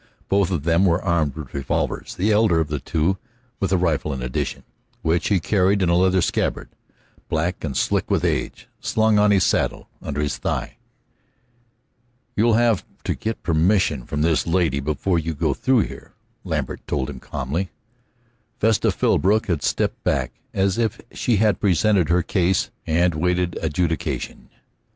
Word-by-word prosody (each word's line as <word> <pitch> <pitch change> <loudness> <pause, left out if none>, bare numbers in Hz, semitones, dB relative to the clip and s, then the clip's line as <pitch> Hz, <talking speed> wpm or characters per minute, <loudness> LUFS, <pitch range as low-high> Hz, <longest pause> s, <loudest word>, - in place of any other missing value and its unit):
Both 100 -2 +2
of 85 -7 -2
them 85 +3 +3
were 85 0 +3
armed 85 -7 0
with 75 -5 -8
revolvers, 70 -1 -2
the 100 +5 +1
elder 105 -5 +4
of 80 -2 -1
the 75 -1 -2
two 80 +8 0 0.4
with 95 - -1
a 95 - +4
rifle 80 -4 0
in 65 -2 -5
addition, 60 0 -3 0.4
which 80 0 +1
he 100 -3 +3
carried 95 +2 +2
in 85 - +2
a 85 - +3
leather 95 0 +3
scabbard - - -1 0.6
black 80 +3 -1
and 70 -5 -3
slick - - 0
with - - +1
age, - - -2
slung 110 -1 +2
on 105 0 +4
his 100 -2 +4
saddle - - 0
under 75 -1 -4
his 75 -1 -1
thigh. - - -3 1.6
"You'll 115 +1 +3
have 115 -3 +3 0.2
to - - 0
get 110 +1 -4
permission 80 - +2
from 75 +1 -1
this 80 0 +1
lady 85 -5 +1
before 75 +5 0
you 80 0 -3
go - - 0
through 130 -3 +2
here," - - -7 0.3
Lambert - - -3
told 65 -3 -1
him 70 -3 -7
calmly. 80 +10 -3 0.9
Vesta 110 0 +3
Philbrook 105 +4 +2
had 85 -8 -1
stepped - - -1
back, - - 0 0.2
as 95 +2 0
if 115 -3 0
she 120 - 0
had 105 -2 +2
presented 95 -2 +3
her 90 0 +3
case 95 +1 +1 0.2
and 85 +2 +2
waited 90 +2 0
adjudication. 80 -3 -2
90 Hz, 165 wpm, -22 LUFS, 80-100 Hz, 1.6 s, elder